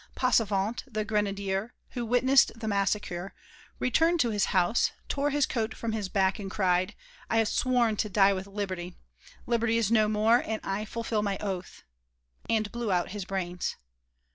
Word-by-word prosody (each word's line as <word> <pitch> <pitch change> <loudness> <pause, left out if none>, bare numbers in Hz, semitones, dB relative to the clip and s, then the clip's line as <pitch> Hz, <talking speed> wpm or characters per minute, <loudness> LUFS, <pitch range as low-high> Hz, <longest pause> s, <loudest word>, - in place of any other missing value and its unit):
Passavant, 220 -3 +1
the 215 -1 -2
grenadier, 200 0 -1 0.2
who 245 - -3
witnessed 260 +3 +4
the 220 - -4
massacre, 195 -2 -1 0.4
returned 330 +7 +2
to 235 - +1
his 205 -2 +2
house, 185 +4 +2 0.2
tore 285 +1 0
his 290 -1 +2
coat 225 -3 -2
from 230 - -3
his 210 -3 -3
back 190 -1 +1
and 195 -1 -5
cried: 185 0 +1 0.3
'I 225 - +1
have 225 -1 +3
sworn 245 -3 +2
to 215 - -1
die 200 0 +4
with 190 0 -5
Liberty; 190 -3 -4 0.5
Liberty 230 -1 +1
is 225 -2 +1
no 215 -2 +4
more, 215 +3 +3
and 220 0 -3
I 195 +2 -2
fulfil 225 -1 -2
my 200 -2 -1
oath,' 190 -3 -5 0.7
and 215 -2 +1
blew 235 -3 -2
out 180 -1 +1
his 205 -2 -5
brains." 180 -2 -3
210 Hz, 165 wpm, -28 LUFS, 195-230 Hz, 0.7 s, witnessed